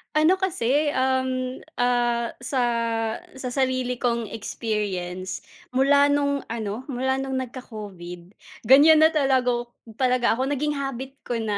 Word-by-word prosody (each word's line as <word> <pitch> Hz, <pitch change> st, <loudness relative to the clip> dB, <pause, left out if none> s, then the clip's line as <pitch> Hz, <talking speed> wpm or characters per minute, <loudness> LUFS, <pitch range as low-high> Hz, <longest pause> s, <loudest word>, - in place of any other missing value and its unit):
Ano 315 Hz, +5 st, +4 dB
kasi, 295 Hz, -5 st, +1 dB
um, 260 Hz, 0 st, 0 dB, 0.2 s
ah, 240 Hz, -1 st, +1 dB
sa, 255 Hz, +1 st, -2 dB, 0.7 s
sa 260 Hz, -1 st, -5 dB
sarili 255 Hz, -1 st, 0 dB
kong 235 Hz, -3 st, -1 dB
experience, 195 Hz, -5 st, -4 dB, 0.3 s
mula 280 Hz, +2 st, +5 dB
nung 285 Hz, -1 st, +1 dB
ano 220 Hz, +2 st, -4 dB
mula 265 Hz, -1 st, -1 dB
nung 270 Hz, 0 st, -3 dB
nagka-COVID, 200 Hz, -8 st, -9 dB, 0.2 s
ganiyan 290 Hz, +6 st, +7 dB
na 315 Hz, -, +7 dB
talaga 270 Hz, -5 st, +2 dB
ak 240 Hz, 0 st, -2 dB, 0.2 s
talaga 250 Hz, -3 st, +2 dB
ako 265 Hz, +3 st, 0 dB
naging 295 Hz, +1 st, -1 dB
habit 270 Hz, 0 st, -5 dB
ko -, -, -3 dB
na, 210 Hz, -2 st, -1 dB
255 Hz, 130 wpm, -24 LUFS, 235-275 Hz, 0.7 s, ganiyan